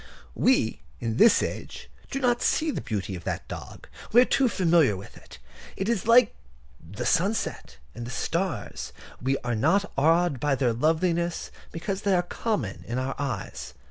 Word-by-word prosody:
We, 115 - +2 0.2
in 115 -1 -2
this 225 +7 +6
age, - - -6 0.2
do 270 - -3
not 245 -2 +2
see 315 0 +2
the - - -3
beauty 100 -3 -3
of 90 - -8
that - - -3
dog. - - -9 0.2
We 240 - +7
are - - +5
too 265 -1 +2
familiar 165 - +3
with 95 - -11
it. - - -14 0.4
It 190 - -2
is 225 -4 0
like 235 -1 +6 0.5
the 90 +6 -7
sunset 180 - 0 0.2
and 120 0 -7
the - - -6
stars: 165 +5 -3 0.3
we 135 +2 +1
are 120 0 -1
not 165 - +2
awed 160 0 +3
by 145 0 +1
their 125 -3 +1
loveliness 165 +6 0 0.2
because 190 +4 -4
they 200 -2 +2
are 175 - +2
common 215 +4 -3
to 120 - -3
our 130 +1 -1
eyes. 130 -9 -4
165 Hz, 175 wpm, -26 LUFS, 120-200 Hz, 0.5 s, We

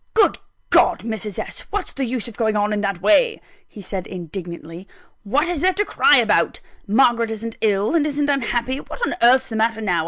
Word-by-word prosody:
"Good 420 -3 +3 0.3
God, - - +4
Mrs. 215 -3 -5
S.! - - -5
what's 405 -2 -4
the 275 - -2
use 245 -1 -4
of 230 - -10
going 220 -2 0
on 210 0 0
in 205 - -1
that 195 -3 -3
way?" 445 - +3 0.3
he 205 - -12
said, 190 -1 -5
indignantly. 170 0 -8 0.4
"What 275 - 0
is 350 -4 -2
there 370 0 +3
to 415 - 0
cry - - +5
about? - - +2 0.3
Margaret 235 +1 +3
isn't 225 +1 -6
ill, 205 +1 +1
and 310 -3 +2
isn't 290 0 -1
unhappy 255 -2 -1
what 475 - -5
on - - -2
earth's 255 +3 +5
the 225 - -5
matter 225 0 0
now? 185 -6 0
225 Hz, 205 wpm, -20 LUFS, 205-270 Hz, 0.4 s, cry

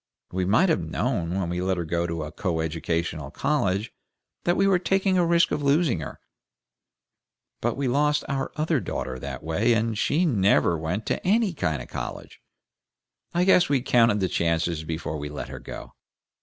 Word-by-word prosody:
We 95 0 -1
might 110 - +4
have 160 - +2
known 95 -8 -2
when 90 - -1
we 90 +1 -2
let 95 0 0
her 85 - -2
go 85 +2 -1
to 85 -2 -3
a 75 - -6
coeducational 80 -3 -2
college 100 - -1 0.5
that 175 +1 +2
we 195 - +3
were 195 -2 +4
taking 190 +1 +1
a - - +4
risk 170 0 +3
of - - -1
losing 140 - +2
her; 80 - -7 1.4
but 120 0 -1
we 140 -1 -1
lost 150 +4 +2
our 135 -1 -2
other 155 -1 +1
daughter 65 - -4
that - - -6
way, 100 +9 +2
and 115 0 0
SHE 155 +11 +1
never 100 - +3
went 80 +7 -3
to - - -2
ANY 210 0 +2
kind 80 - -2
of - - -13
college. - - -7 0.9
I 175 - +3
guess 180 -3 +5
we 140 -2 +3
counted 115 -5 +3
the 95 - +2
chances 85 -1 0
before 80 -1 -4
we 75 0 -5
let 75 - -6
her - - -7
go. - - -9
105 Hz, 185 wpm, -25 LUFS, -, 1.4 s, guess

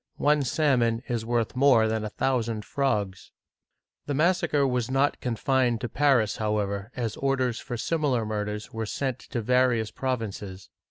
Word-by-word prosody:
One 150 0 +3
salmon 125 -4 +1
is 115 -3 -2
worth 120 -1 0
more 125 -4 +5
than 110 0 -1
a 110 - -3
thousand 115 -3 -1
frogs! 105 -9 -1 0.4
" - - -59
The 145 - -1
massacre 155 -3 +2
was 125 -3 0
not 135 +2 +1
confined 125 0 +1
to 120 - -3
Paris, 135 -8 +2
however, 105 0 -2
as 115 -4 -3
orders 130 -3 0
for 120 - -5
similar 135 -4 0
murders 105 0 -4
were 110 -1 -3
sent 130 +2 -2
to 120 -2 -5
various 125 -2 +2
provinces. 105 -7 -4
120 Hz, 155 wpm, -26 LUFS, 110-135 Hz, 0.4 s, more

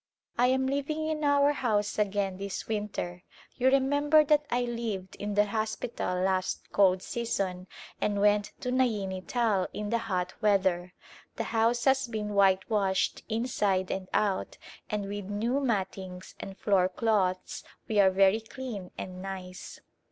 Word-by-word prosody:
I 245 +1 +4
am 265 +1 +2
"living 285 +3 -1
in 310 -1 -2
our 285 0 +4
house 210 -6 0
again 200 -2 0
this 200 0 -5
winter. 205 -5 -3 0.3
You 255 - +1
remember 285 +3 +4
that 300 0 +3
I 245 +1 +1
lived 230 -6 -4
in 205 0 -3
the 205 0 +5
hospital 215 -3 -2
last 185 -1 -1
cold 190 -2 +4
season 195 -6 -2 0.3
and 205 -1 0
went 205 0 +3
to 250 - -2
Naini 210 -7 0
Tal 220 -6 +1
in 210 0 -4
the 235 - +2
hot 185 -5 -2
weather. 190 -4 +2 0.4
The - - -2
house 230 +1 +2
has 270 -1 +3
been 215 -3 -3
whitewashed 195 0 +2
inside 210 -5 0
and 190 -1 -4
out 200 -3 0 0.3
and 210 -1 -2
with 205 0 -5
new 220 +7 -1
mattings 190 -7 -3
and 195 0 -7
floor 190 -3 +2
cloths 185 -3 0 0.2
we 215 -2 +1
are 195 -1 +7
very 195 +3 +4
clean 225 -4 -7
and 185 0 -6
nice. 185 -1 -7
205 Hz, 150 wpm, -29 LUFS, 190-240 Hz, 0.4 s, are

